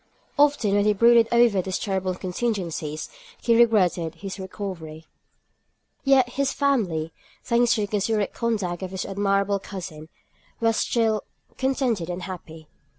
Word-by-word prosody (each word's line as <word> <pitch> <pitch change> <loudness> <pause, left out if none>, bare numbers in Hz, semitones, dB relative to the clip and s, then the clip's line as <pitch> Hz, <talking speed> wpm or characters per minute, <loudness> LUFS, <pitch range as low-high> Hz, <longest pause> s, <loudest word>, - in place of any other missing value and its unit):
Often 285 -8 +3
when 205 0 +3
he 210 - +4
brooded 230 +2 +5
over 235 -5 +4
these 185 0 -3
terrible 190 -2 -2
contingencies, 180 -6 -3 0.3
he 235 - +2
regretted 185 -8 +3
his 195 +3 -7
recovery. 175 -5 -7 1.0
Yet 270 -3 +4
his 275 +2 0
family, 190 - 0 0.3
thanks 235 0 +3
to 215 - -1
the 205 - -1
considerate 210 +1 0
conduct 205 -7 -2
of 185 - -4
his 190 0 -4
admirable 200 0 0
cousin, 170 -5 -8 0.5
were 225 0 +2
still 220 -2 +1 0.3
contented 255 -9 0
and 180 +1 -4
happy. 165 -4 -9
200 Hz, 135 wpm, -24 LUFS, 180-235 Hz, 1.0 s, brooded